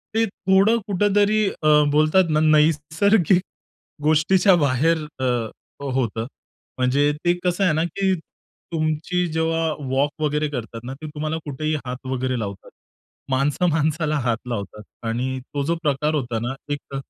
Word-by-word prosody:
ते 225 0 +3
थोडं 195 +2 +2
कुठेतरी 205 +2 +2
अ, 155 - -3 0.2
बोलतात 155 +4 +3
ना 155 0 +2
नैसर्गिक 160 +5 +3 0.6
गोष्टीच्या 175 +5 +4
बाहेर 155 +2 +2 0.2
अ, 125 -3 0 0.3
होतं. 125 -5 -1 0.5
म्हणजे 135 +3 +2
ते 175 - +4
कसं 180 +2 +1
आहे 180 -5 +3
ना, 160 +1 +1
की 190 +3 0 0.6
तुमची 160 +3 0
जेव्हा 160 0 0 0.2
वॉक 140 +2 +2
वगैरे 150 0 +1
करतात 115 -4 -6
ना, 130 +2 -6
ते 155 +3 -9
तुम्हाला 155 +1 -3
कुठेही 155 +2 -2
हात 125 +1 -6
वगैरे 130 -1 -1
लावतात. 100 -3 -6 0.6
माणसं 140 +7 +1
माणसाला 155 0 0
हात 120 -3 0
लावतात 105 -2 -5 0.2
आणि 125 +3 -2
तो 140 -1 -1
जो 170 +3 +1
प्रकार 150 +1 +1
होता 120 -5 -2
ना, 120 +3 -3 0.2
एक 140 -1 -7
150 Hz, 140 wpm, -22 LUFS, 130-170 Hz, 0.6 s, गोष्टीच्या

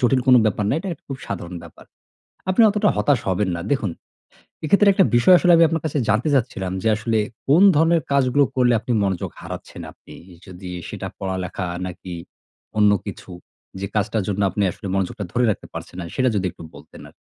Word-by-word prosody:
জটিল 130 +1 +3
কোনো 130 -1 +7
ব্যাপার 105 -1 0
না। - - +1
এটা 195 - -6
একটা - - -12
খুব 135 - -5
সাধারণ 90 -2 -6
ব্যাপার। 85 - -14 0.7
আপনি 185 +5 +4
অতটা 210 0 +1
হতাশ 125 +5 +2
হবেন 95 +1 0
না। - - -5
দেখুন, 115 -9 0 0.7
এক্ষেত্রে 200 +6 +4
একটা 190 - +4
বিষয় 120 +10 +6
আসলে 180 - +3
আমি 165 - +6
আপনার 165 -1 -2
কাছে 150 -1 -2
জানতে 110 +7 +2
চাচ্ছিলাম 110 -8 -1
যে 110 - +1
আসলে 110 +1 -1 0.3
কোন 150 +6 +5
ধরনের 165 +2 +3
কাজগুলো 140 0 +3
করলে 125 -2 +3
আপনি 120 - -5
মনোযোগ 95 -3 -2
হারাচ্ছেন - - -8
আপনি? - - -16 0.3
যদি 90 -1 -10 0.2
সেটা - - -6
পড়ালেখা 95 -1 -4 0.2
নাকি 90 0 -8 0.6
অন্য 105 -1 +5
কিছু 100 -1 -8 0.5
যে 100 - -3
কাজটার 105 0 0
জন্য 100 0 -2
আপনি 105 - -1
আসলে 100 - -9
মনোযোগটা 95 +1 -2
ধরে 125 0 +2
রাখতে 105 - -3
পারছেন - - -8
না - - -4
সেটা 130 -1 +2
যদি 95 -2 0
একটু - - -13
বলতেন - - -14
আরকি? - - -23
110 Hz, 190 wpm, -21 LUFS, 95-140 Hz, 0.7 s, কোনো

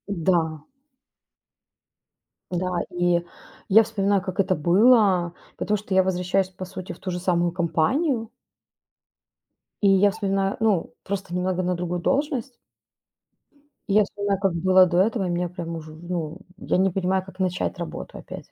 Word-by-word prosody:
Н-да. 160 -3 0 1.9
Да. 180 0 -1
И 175 -1 +1 0.5
я 220 +3 +7
вспоминаю, 200 -3 0
как 185 +1 -6
это 190 -1 +2
было, 185 +1 +4 0.2
потому 210 0 0
что 200 -1 -6
я 190 0 +5
возвращаюсь, 185 +1 0
по 185 0 -9
сути, 185 -1 -7
в - - -16
ту 185 - -4
же 180 - -3
самую 175 -1 +1
компанию 225 - 0 1.5
И 200 - +5
я 195 +1 +5
вспоминаю 195 -2 -1
ну, 215 -6 +1
просто 195 -2 -4
немного 185 0 0
на 180 0 0
другую 175 0 -3
должность. 275 - -1 1.3
И - - +1
я 210 0 +6
вспоминаю, 200 -1 -2
как 195 -3 +2
было 185 +2 +5
до 175 0 0
этого, 205 -2 0
и - - -2
меня 175 0 -1
прям 170 -1 -6
уже, 155 -1 -10
в 160 +2 -14
ну, 170 -1 -4 0.2
я - - -1
не 190 +1 +3
понимаю, 185 +1 0
как 190 0 -14
начать 185 0 -1
работу 170 - -6
опять. - - -10
185 Hz, 155 wpm, -24 LUFS, 175-200 Hz, 1.9 s, я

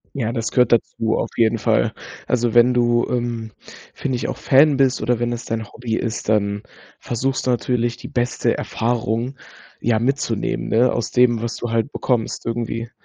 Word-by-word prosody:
Ja, 115 -4 -1
das 115 -2 -2
gehört 125 -1 +3
dazu 115 -1 +1
auf - - -1
jeden 115 0 +3
Fall. - - +2 0.3
Also, 120 -2 +1
wenn 120 +2 +5
du, 120 -1 +2
ähm, 120 -2 -2 0.4
finde 130 -3 -2
ich, 120 - -3
auch - - -3
Fan 140 +1 +5
bist 135 -1 +2
oder 120 +1 +1
wenn 120 0 0
es 120 - -5
dein 115 -1 -3
Hobby 115 -2 -4
ist, 115 -2 -3
dann 100 -1 +1 0.4
versuchst 130 +3 -2
du - - +3
natürlich 120 -1 0
die - - -9
beste 120 0 0
Erfahrung 120 +2 -2 0.4
ja 115 -2 +2
mitzunehmen, 125 -3 -1
ne, 120 +3 +3
aus 120 - -2
dem, 125 -2 +4
was 115 - -2
du 120 - -4
halt 115 +4 0
bekommst 120 -4 -1
irgendwie. 115 0 -3
120 Hz, 180 wpm, -21 LUFS, 115-125 Hz, 0.4 s, wenn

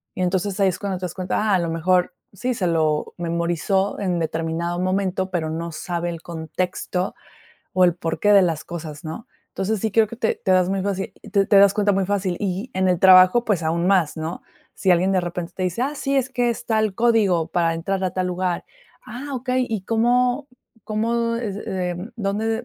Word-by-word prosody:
y 185 - -4
entonces, 190 +2 -1
ahí 195 - +5
es 180 - -4
cuando 195 -2 -3
te 180 - -4
das 175 - -5
cuenta: 185 -1 -2
"Ah, 195 - +5
a - - +2
lo 170 - -1
mejor", 180 +2 +1 0.2
sí, 250 +6 -2
se 190 -5 -1
lo 155 -2 0
memorizó 170 +4 -1
en 180 -3 -1
determinado 165 +2 -2
momento, 190 0 0
pero 165 -4 -2
no 165 +1 -4
sabe 175 +2 -3
el 170 -1 -6
contexto 180 +2 -3 0.6
o 185 - +2
el 175 - +4
porqué 165 +5 +1
de 200 -1 +7
las 160 -3 -1
cosas, 155 -3 -7
¿no?, 160 +9 -7 0.3
entonces, 205 +3 0
sí 220 +1 -2
creo 220 0 +4
que 230 - -8
te 225 -2 -1
te - - +1
das 185 -1 +4
muy 195 0 -1
fácil 195 -1 -2 0.2
te 200 -1 +3
te 205 - +4
das 200 0 +6
cuenta 205 -1 +2
muy 195 -1 +1
fácil 195 -3 -1
y 200 +5 -3
en 190 0 +2
el 180 -1 +2
trabajo, 185 +5 +7
pues 195 -7 0
aún 170 +2 0
más, 185 -6 +2
¿no?, 160 +2 -5 0.3
si 190 - +1
alguien 180 +2 +3
de 185 - +3
repente 175 -1 -5
te 185 - -4
dice: 185 +6 -1
"Ah, 280 +3 -1
sí, 275 -1 -1
es 260 -1 +1
que 245 -2 +1
es 235 +1 -5
tal 215 -3 +1
código 215 -8 +3
para 170 -1 +1
entrar 190 +3 -2
a 185 - 0
tal 185 +1 -1
lugar". 180 -1 -2 0.4
"Ah, 265 +4 -7
okey, 255 0 0
¿y 215 -4 -2
cómo 245 +4 +1 0.3
cómo 230 +2 -1
es, 220 -5 -3
em 180 +2 -3
dónde 220 +2 -1
185 Hz, 210 wpm, -22 LUFS, 175-215 Hz, 0.6 s, de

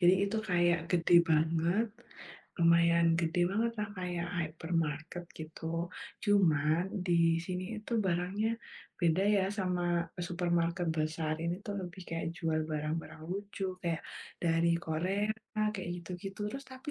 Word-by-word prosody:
Jadi 180 +1 +7
itu 200 +3 -2
kayak 175 -4 +2
gede 175 0 +3 0.2
banget, 165 +7 +3 0.7
lumayan 170 0 +5
gede 165 +1 0
banget 225 +4 +1
lah, 210 - -2
kayak 175 -1 -2
Hypermarket 165 0 -2
gitu. 160 +1 -8 0.6
Cuman 165 -6 +4 0.2
di 165 -1 +4
sini 185 0 -3 0.2
itu 215 - -8
barangnya 185 +5 0 0.5
beda 170 +1 +3
ya 195 - +3
sama 180 -2 0 0.5
supermarket 175 0 0
besar. 155 0 0
Ini 170 +1 0
tuh, 205 - -3
lebih 185 0 -7
kayak 165 0 -2
jual 160 -2 0
barang-barang 155 +1 -3
lucu 200 +1 -4 0.2
kayak 170 -2 -1 0.4
dari 165 0 +3
Korea 185 +6 0 0.4
kayak 190 -4 -5
gitu-gitu, 180 +3 -7
terus 275 +1 -6
tapi 260 +2 -7
175 Hz, 130 wpm, -32 LUFS, 165-185 Hz, 0.7 s, Jadi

